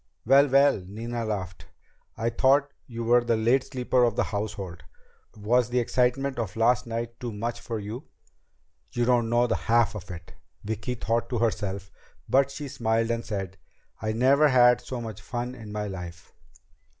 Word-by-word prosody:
"Well, 135 +4 +6
well!" 140 -6 +4
Nina 115 +3 -4
laughed. 95 -4 -5 0.5
"We 115 +2 -1
thought 140 +4 +3 0.2
you 115 -1 -5
were 120 +1 +4
the 115 -1 +1
late 120 +4 +2
sleeper 125 -2 +1
of 120 -3 +2
the - - +2
household! 100 -4 -5 0.6
Was 120 +4 +2
the 125 - -1
excitement 125 +2 +1
of 105 -6 -3
last 120 +2 +2
night 115 0 -4
too 120 -2 -4
much 115 +3 -4
for 115 - -5
you?" 110 +6 -6 0.9
"You 120 0 +1
don't 120 -2 +2
know 120 +1 +3
the 115 - 0
half 115 0 +2
of 100 -2 -8
it!" 85 -2 -9 0.3
Vicki 110 +4 -3
thought 115 0 -1
to 125 - -1
herself, 100 -4 -2 0.4
but 135 +1 +3
she 145 +1 -6
smiled 115 -2 0
and 115 0 -2
said: 95 -3 -5 0.4
"I 110 - -1
never 135 +6 +4
had 125 -3 +5
so 125 -2 -6
much 110 -3 -7
fun 120 +5 -4
in 115 -4 -10
my 105 0 -3
life." 90 -3 -8
115 Hz, 175 wpm, -26 LUFS, 105-125 Hz, 0.9 s, Well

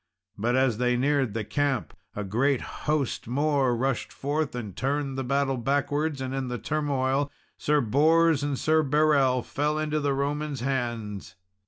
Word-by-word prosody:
But 120 +4 0
as 130 -4 +2
they 125 0 +2
neared 135 -3 +1
the 110 - -1
camp, 140 +2 -1 0.2
a 105 - -3
great 125 +7 +1 0.3
host 150 -7 0
more 140 -1 +1
rushed 130 0 -1
forth, 145 0 -2
and 105 -6 -6
turned 140 +2 -1
the 135 - -2
battle 135 +1 0
backwards, 145 +3 0
and 130 0 -3
in 135 -1 -2
the 125 0 -3
turmoil, 140 -1 0 0.2
Sir 150 0 +1
Bors 155 +6 +3
and 145 -1 -1
Sir 155 +3 +3
Berel 140 -3 +3
fell 150 +1 -1
into 155 0 0
the 140 -2 0
Romans' 145 -1 -2
hands. 120 -6 -3
135 Hz, 160 wpm, -27 LUFS, 125-145 Hz, 0.3 s, Bors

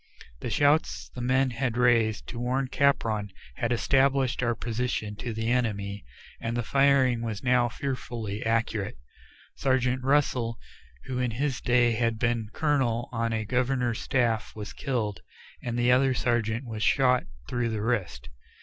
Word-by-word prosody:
The - - -4
shouts 145 +7 +2
the 125 - -6
men 130 +1 +2
had 120 0 -2
raised 115 -3 +3
to 120 - -6
warn 130 +2 -1
Capron 115 -8 +1 0.3
had 120 - -1
established 135 +1 +2
our 120 -1 +1
position 115 -2 -2
to 120 - -4
the 110 +1 -1
enemy, 105 -5 -1 0.4
and 115 +1 -3
the 120 - 0
firing 135 -2 +3
was 110 -3 -4
now 125 -1 +3
fearfully 115 -5 -4
accurate. 115 - -1 0.6
Sergeant 130 -1 +1
Russell, 130 -4 +1 0.5
who 125 -1 -3
in 125 -1 +1
his 130 +3 -2
day 120 -1 +3
had 115 0 0
been 115 -1 0
a - - -26
colonel 130 -7 +1
on 115 -1 -1
a 110 -1 -1
governor's 125 0 0
staff, 115 -4 0
was 105 -1 -7
killed, 110 -7 -2 0.4
and 120 -1 -3
the 120 +1 +3
other 130 +1 +4
sergeant 120 0 0
was 110 -3 -6
shot 125 0 +3 0.2
through 120 -2 -1
the 110 -2 -2
wrist. 95 - -2
120 Hz, 155 wpm, -27 LUFS, 115-130 Hz, 0.6 s, other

